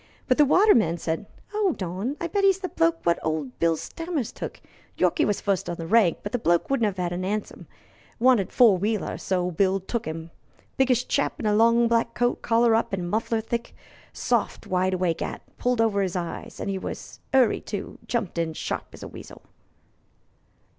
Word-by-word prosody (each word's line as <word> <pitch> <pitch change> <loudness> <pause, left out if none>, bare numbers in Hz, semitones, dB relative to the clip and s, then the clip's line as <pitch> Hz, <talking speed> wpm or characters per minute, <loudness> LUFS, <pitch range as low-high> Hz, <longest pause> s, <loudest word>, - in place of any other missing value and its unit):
But 255 - +2
the 295 - +7
waterman 260 - +4
said: 165 +3 -3 0.3
"'Old 395 - 0
on 195 - -3
I - - -3
bet 400 +3 -1
'e's 390 -1 +5
the 375 -2 -5
bloke 330 0 +1
wot 170 0 +3
old 155 -5 -3
Bill 165 -1 +2
Stammers 330 - -4
took. - - -7 0.4
Yorkey 315 - +2
was 205 - 0
fust 195 -4 -1
on 175 - -2
the 165 - -6
rank, 195 -2 +3
but 205 - -4
the 245 - -1
bloke 175 +3 +1
wouldn't 240 -5 +2
'ave 175 -1 -1
a - - -3
'ansom 205 +3 -4 0.5
wanted 240 -5 +4
a - - -23
four 220 -7 +5
wheeler, 210 +2 -1
so 185 -1 0
old 180 -2 -4
Bill 195 0 +3
took 220 +3 -4
'im. 160 +1 -6 0.4
Biggish 250 -2 +2
chap 280 - 0
in - - -4
a 210 - +3
long 230 +2 +4
black 230 0 +1
coat, 245 0 0
collar 230 0 +3
up 225 -2 +1
an' 180 -2 -4
muffled 220 +2 -1
thick; 235 +1 -4 0.4
soft - - -1
wide 185 0 +1
awake 180 -3 -1
'at, - - -4 0.2
pulled 245 -1 +1
over 220 -3 +2
'is 190 -2 -2
eyes; 175 -2 -5
and 200 - -2
he 190 - -2
was - - -7
in 265 - +5
a - - +8
'urry, 225 - -1
too. 205 -2 -6
Jumped 225 -8 -2
in 165 -1 -1
sharp - - -4
as - - -11
a - - -6
weasel." - - -12
215 Hz, 205 wpm, -25 LUFS, 180-245 Hz, 0.5 s, a